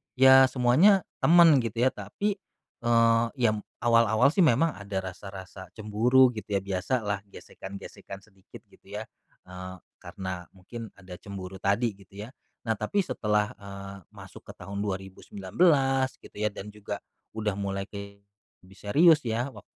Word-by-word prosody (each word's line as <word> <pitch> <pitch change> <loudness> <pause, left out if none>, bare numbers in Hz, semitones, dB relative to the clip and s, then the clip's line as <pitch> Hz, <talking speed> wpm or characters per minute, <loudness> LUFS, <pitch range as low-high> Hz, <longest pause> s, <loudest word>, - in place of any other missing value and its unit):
ya, 130 +1 +7 0.2
semuanya 150 +11 +4 0.2
temen, 165 -4 +6
gitu 115 +1 -2
ya, 130 - +4
tapi, 195 - -4 0.4
eee, 115 0 +4
ya, 120 -4 +2
m 105 - -4 0.2
awal-awal 115 +3 +4
sih 195 - -3
memang 150 +5 +3
ada 100 -2 -4
rasa-rasa 95 0 -9
cemburu, 120 +4 +3
gitu 105 -2 -5
ya. 100 - +1
Biasalah 100 +2 -2
gesekan-gesekan 100 0 -10
sedikit 95 -3 -16
gitu - - -23
ya, - - -5 0.4
eee, 90 0 -8 0.2
karena 90 0 -7
mungkin 110 +5 -9
ada 95 -2 -11
cemburu 95 -2 -8
tadi 105 +5 +1
gitu 100 +1 -11
ya. 115 - -9 0.4
Nah, 110 - +1
tapi 200 -1 0
setelah, 105 - 0
eee, 100 0 -9 0.2
masuk - - -13
ke - - -9
tahun 100 +3 -7
2019 105 - 0
gitu - - -15
ya, 105 - +1
dan 105 +1 -9
juga 105 -1 -6 0.4
udah 110 -1 -1
mulai 100 0 -3
ke 100 0 -10 0.4
lebih 95 +1 -18
serius 155 +9 +5
ya, 120 +3 -3
wak - - -12
105 Hz, 150 wpm, -27 LUFS, 100-125 Hz, 0.4 s, ya